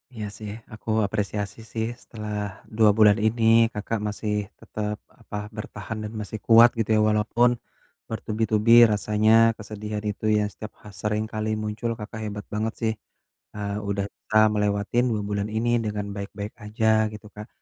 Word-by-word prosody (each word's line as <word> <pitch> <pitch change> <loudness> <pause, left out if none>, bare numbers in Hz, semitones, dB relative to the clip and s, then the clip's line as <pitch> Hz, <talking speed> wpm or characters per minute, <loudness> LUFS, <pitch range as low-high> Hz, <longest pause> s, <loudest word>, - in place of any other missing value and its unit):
Iya 110 -2 -4
sih. 105 -2 -6 0.2
Aku 110 - -9 0.2
apresiasi 100 -1 -3 0.2
sih 110 -1 -1 0.2
setelah 105 -2 -7 0.4
2 110 -2 +6
bulan 105 -1 +6
ini 115 +1 +1 0.3
Kakak 105 +1 -3
masih 105 0 -3 0.3
tetep 105 0 -4 0.2
apa 105 - -9 0.2
bertahan 105 +1 -6
dan 105 +1 -6
masih 110 +1 -6
kuat 115 +1 +8
gitu 110 -1 -1
ya, 110 - +4
walaupun 115 +3 +3 0.6
bertubi-tubi 110 0 0 0.2
rasanya 105 +1 +2 0.3
kesedihan 105 0 -5
itu 105 +1 -5
ya, 105 - +2
setiap 110 - -9
ha - - -13
seringkali 110 0 -2
muncul 105 +2 -3
Kakak 110 +1 -7
hebat 105 -1 -5
banget 110 +1 -1
sih, 110 -1 +1 0.6
eee, 100 -1 -3
udah 100 0 -1
bisa 110 - -1 0.2
melewatin 105 +3 +1
2 105 - -1
bulan 100 0 -1
ini 120 +2 +1 0.2
dengan 105 -1 -2
baik-baik 100 +1 -6
aja 110 +1 -1 0.3
gitu 105 0 -10
Kak. 105 +1 -8
105 Hz, 155 wpm, -25 LUFS, 105-110 Hz, 0.6 s, kuat